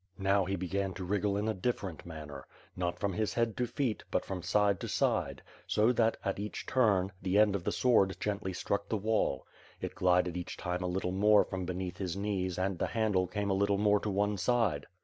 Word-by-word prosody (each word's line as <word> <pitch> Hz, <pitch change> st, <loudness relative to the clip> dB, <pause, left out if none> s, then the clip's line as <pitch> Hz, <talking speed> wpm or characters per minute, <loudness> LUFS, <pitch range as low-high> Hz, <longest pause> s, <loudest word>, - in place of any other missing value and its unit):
Now 95 Hz, 0 st, +2 dB
he 95 Hz, +2 st, -1 dB
began 95 Hz, +1 st, -2 dB
to 95 Hz, -, -5 dB
wriggle 100 Hz, +2 st, 0 dB
in 105 Hz, +2 st, -1 dB
a 110 Hz, -, +1 dB
difiEerent 95 Hz, -5 st, -3 dB
manner. 75 Hz, -4 st, -8 dB, 0.3 s
Not 90 Hz, -1 st, -2 dB
from 100 Hz, +1 st, -1 dB
his 110 Hz, +2 st, -1 dB
head 115 Hz, -3 st, +1 dB
to 125 Hz, -, 0 dB
feet, 120 Hz, -4 st, -2 dB
but -, -, -1 dB
from 95 Hz, -2 st, -4 dB
side 100 Hz, +1 st, +2 dB
to -, -, -5 dB
side; -, -, 0 dB, 0.2 s
so 110 Hz, +3 st, +3 dB
that, 115 Hz, -2 st, +2 dB
at 100 Hz, 0 st, -1 dB
each 105 Hz, +1 st, -5 dB
turn, 100 Hz, -7 st, +2 dB
the 95 Hz, +2 st, +1 dB
end 105 Hz, -1 st, +5 dB
of 95 Hz, -, -3 dB
the -, -, 0 dB
sward 100 Hz, -7 st, +3 dB
gently 100 Hz, -2 st, -2 dB
struck 100 Hz, +2 st, -2 dB
the 110 Hz, -, 0 dB
wall. 110 Hz, +2 st, 0 dB, 0.3 s
It -, -, -4 dB
glided 90 Hz, -1 st, +2 dB
each 90 Hz, -1 st, -5 dB
time 90 Hz, 0 st, -3 dB
a 90 Hz, -, -1 dB
little 90 Hz, 0 st, -1 dB
more 105 Hz, +2 st, +5 dB
from 95 Hz, -1 st, -4 dB
beneath 90 Hz, 0 st, -4 dB
his 95 Hz, -2 st, -3 dB
knees 95 Hz, -3 st, -2 dB
and 95 Hz, -1 st, -1 dB
the -, -, 0 dB
handle 105 Hz, -5 st, +1 dB
came 100 Hz, +2 st, -2 dB
a -, -, +3 dB
little 100 Hz, +1 st, +2 dB
more 105 Hz, 0 st, +3 dB
to 105 Hz, -, -3 dB
one 105 Hz, +1 st, 0 dB
side. 105 Hz, -9 st, +1 dB
100 Hz, 220 wpm, -31 LUFS, 90-105 Hz, 0.3 s, end